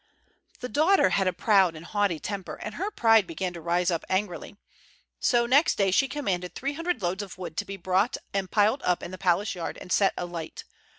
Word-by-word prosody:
The 250 - -3
daughter 305 - +3
had 195 0 +2
a - - +3
proud 190 -2 +3
and 155 +2 -10
haughty 200 -4 0
temper, 195 +1 -5
and 210 - -7
her 390 - -3
pride 225 - +4
began 180 +2 -4
to 170 - -8
rise 175 +2 +1
up 165 - -2
angrily. 190 0 -2 0.6
So 240 -1 +2
next 275 +6 +4
day 195 -2 +2
she 270 +8 +3
commanded 195 -11 -3
three 275 +2 -3
hundred 330 - -3
loads 180 +3 -1
of 195 -3 -9
wood 185 - -7
to 205 - -1
be 195 0 -7
brought 190 +5 +1 0.2
and 195 -2 -1
piled 215 +7 +2
up 180 -1 0
in - - -6
the 185 - -8
palace 185 +3 +1
yard 175 -3 -5
and 180 - -10
set 195 -1 +3
alight. 175 -2 -6
195 Hz, 215 wpm, -27 LUFS, 180-225 Hz, 0.6 s, pride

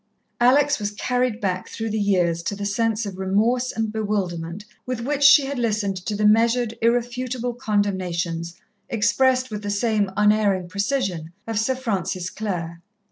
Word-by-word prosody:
Alex 270 +4 +4
was 205 -1 -1
carried 245 +2 -1
back 185 -3 -2
through 225 -1 -4
the 220 - -1
years 180 -5 +1
to 170 +4 -3
the 200 0 -5
sense 220 +2 0
of 190 -2 -7
remorse 225 +7 +1
and 225 -1 -2
bewilderment 195 -4 -3 0.2
with 250 -2 -4
which 285 +3 -2
she 280 0 +7
had 275 -1 -3
listened 210 -4 0
to 185 +3 -4
the 210 +1 0
measured, 230 +2 +3
irrefutable 245 +1 0
condemnations, 180 -7 -2 0.3
expressed 255 +3 +2
with 210 -1 -4
the 205 - -4
same 205 -1 +1
unerring 210 -3 +3
precision, 195 - -2
of 225 -2 -1
Sir 260 +4 +1
Francis 190 -7 -2
Clare. 170 -5 -4
210 Hz, 155 wpm, -23 LUFS, 190-240 Hz, 0.3 s, she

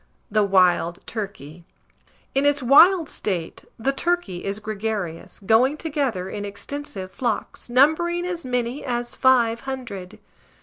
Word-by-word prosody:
THE 215 0 +3
WILD 180 -3 +2
TURKEY. 185 - -7 0.7
In 275 - +2
its 285 -1 +2
wild 325 +6 +6
state, 180 - -4
the 265 +4 0
turkey 340 - -1
is 200 +1 -2
gregarious, 210 -5 -4
going 250 +8 +4
together 280 - -2
in 205 +1 -5
extensive 200 -1 -7
flocks, 235 +1 -3
numbering 320 +7 +3
as 355 -2 -4
many 250 +1 -2
as 240 -2 -3
five 235 -3 +3
hundred. 210 -8 -6
235 Hz, 125 wpm, -23 LUFS, 195-280 Hz, 0.7 s, wild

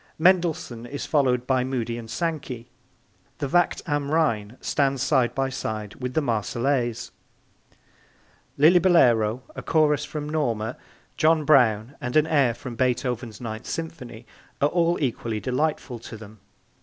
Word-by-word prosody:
Mendelssohn 160 -9 +1
is 140 +3 -5
followed 125 -5 +1
by 130 -1 +2
Moody 120 -3 -2
and 115 -1 -8
Sankey; 135 -5 -3 0.7
the 145 - -2
Wacht 175 +5 +1
am 145 -3 -1
Rhein 120 -8 0
stands 135 -2 0
side 130 -5 +2
by 135 0 0
side 110 -5 -4
with 125 0 -4
the 155 - +2
Marseillaise; 120 +1 -1 1.5
Lillibulero, 140 - +4
a - - -5
chorus 150 -2 +2
from 150 -1 -5
Norma, 120 -7 -1 0.4
John 155 -1 +3
Brown 120 -4 +4
and 120 0 -4
an 155 0 +5
air 140 -7 +2
from 120 -1 -8
Beethoven's 125 -2 -1
Ninth 110 -1 -6
Symphony 130 -8 -6 0.3
are 145 - +3
all 170 0 +2
equally 115 -5 -2
delightful 130 +1 -2
to 115 0 -9
them. 110 0 -13
130 Hz, 135 wpm, -24 LUFS, 115-150 Hz, 1.5 s, an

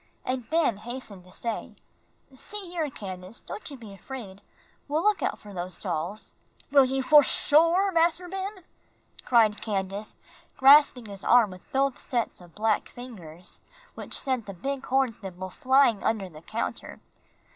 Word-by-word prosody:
And 255 -2 -3
Ben 315 -9 +2
hastened 215 -4 -8
to 180 - -16
say, 230 +4 -3 0.6
"See 380 +7 -4
here, 325 -4 -1
Candace, 190 -3 -7
don't 335 - -7
you 280 - -9
be 220 -5 -11
afraid; 200 -2 -9 0.5
we'll 305 +3 0
look 420 -1 +3
out - - -1
for 205 -1 -12
those 180 0 -6
dolls." 180 +3 -4 0.4
"Will 275 -2 +7
you 265 +1 -1
for 300 +3 +8
shore, 335 +8 +4
Mas'r 340 +1 +2
Ben?" 385 +1 -5 0.6
cried 220 -4 +3
Candace, 200 0 -3 0.4
grasping 270 -3 +7
his 200 -2 -8
arm 235 -5 +5
with 185 0 -14
both 270 -1 +1
sets 235 -6 -2
of 175 -2 -16
black 215 0 0
fingers, 185 -9 -10 0.3
which - - -4
sent 255 -5 -1
the 195 - -7
big 275 +8 -4
horn 265 -2 +2
thimble 185 -2 -8
flying 260 0 +4
off - - -9
under 210 -4 -3
the 155 -2 -13
counter. 220 +7 -5
240 Hz, 155 wpm, -27 LUFS, 195-280 Hz, 0.6 s, for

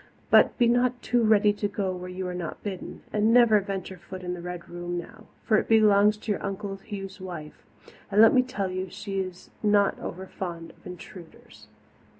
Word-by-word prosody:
But - - +6
be 240 - +4
not 245 +1 +2
too 240 +1 +2
ready 210 -1 +4
to 205 0 -2
go 200 -2 -2
where 180 0 -7
you 185 +1 -5
are 180 - -4
not 175 -3 -6
bidden, 190 -3 -6
and 215 +1 +3
never 235 -3 +6
venture 190 -2 -5
foot 185 +1 -9
in 180 0 -3
the 175 - -6
Red 180 0 -7
Room 175 0 -5
now, 220 +5 -9 0.2
for 215 - +3
it - - 0
belongs 210 -1 +5
to 215 0 -4
your 205 - -2
Uncle 195 0 -4
Hugh's 195 -2 -7
wife, 170 -5 -8 0.5
and 200 +1 +1
let 225 0 +8
me 255 - +6
tell 205 -7 -3
you 185 +1 -3
she 195 +1 -5
is 185 -1 -6
not 205 -2 +3
over 185 +2 -6
fond 170 -3 -6
of - - -16
intruders." 180 -1 -12
195 Hz, 200 wpm, -26 LUFS, 180-215 Hz, 0.5 s, let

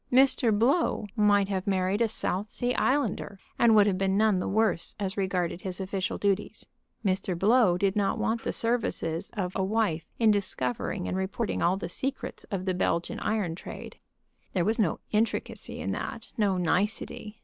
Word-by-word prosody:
Mr. 255 -2 +5
Blow 255 +1 +2
might 205 -2 +4
have 190 -1 -3
married 190 +2 +1
a 230 - +4
South 210 -1 -2
Sea 245 +3 -1
Islander, 260 -8 0 0.2
and 230 -2 +6
would 210 -1 +7
have 190 -2 +1
been 195 0 +1
none 215 -3 +3
the - - -2
worse 210 -4 0
as 195 -2 -2
regarded 185 -3 -1
his 185 -1 -4
official 190 0 -2
duties. 200 0 -1 0.4
Mr. 185 -2 0
Blow 210 -1 +4
did 195 +1 +1
not 200 -2 +1
want 225 +1 0
the - - -2
services 205 -7 -1
of 185 -2 -2
a 190 - +1
wife 195 -5 0
in 225 -2 +4
discovering 190 -3 -2
and - - -2
reporting 195 +4 -2
all 180 +2 +2
the - - -4
secrets 265 +9 -3
of 190 -2 -4
the 185 - +1
Belgium 170 -1 -1
iron 205 -6 0
trade. 170 - -9 0.5
There 180 -3 +1
was 220 +3 +1
no 195 -7 +1
intricacy 220 +2 -1
in - - -2
that, - - -5
no 200 -4 +1
nicety. 210 +4 -1
200 Hz, 175 wpm, -28 LUFS, 185-220 Hz, 0.5 s, would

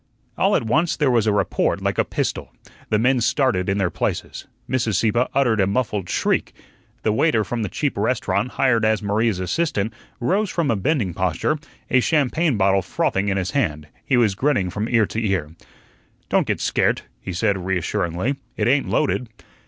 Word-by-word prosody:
All - - +2
at - - +1
once 155 +9 +1
there 145 -4 +2
was 115 -3 +2
a - - +4
report 100 -3 0
like - - -1
a - - +5
pistol. - - -3 0.4
The 105 - +2
men 125 +3 +2
started 115 -6 +1
in 95 - +1
their 95 -3 0
places. - - -3 0.2
Mrs. 120 -5 0
Sieppe 120 +2 +2
uttered 120 -6 +3
a 95 - +2
muffled 105 -3 -1
shriek. - - 0 0.5
The 110 - +2
waiter 110 -1 +2
from 115 +4 -3
the 105 - -2
cheap 145 - -2
restaurant, 110 +1 0
hired 120 -4 +2
as 110 0 +2
Maria's 105 -1 +1
assistant, 110 - -1 0.3
rose 195 - +1
from 165 -8 0
a - - +2
bending 105 - 0
posture, 95 - 0 0.3
a 130 - +5
champagne 150 0 +1
bottle 95 0 +3
frothing 95 +1 -1
in 100 -1 0
his 90 -2 -2
hand; 75 -2 -1
he 130 - +1
was 110 -5 +3
grinning 100 -5 0
from 105 +4 -3
ear 115 -3 +3
to 110 +3 -3
ear. 95 -8 -1 0.8
"Don't - - +2
get - - -1
scairt," - - +1 0.2
he 95 - -6
said, 90 +1 0
reassuringly, 90 - -1 0.2
"it - - +1
ain't 135 +2 +2
loaded." 125 -5 0
110 Hz, 185 wpm, -22 LUFS, 95-130 Hz, 0.8 s, a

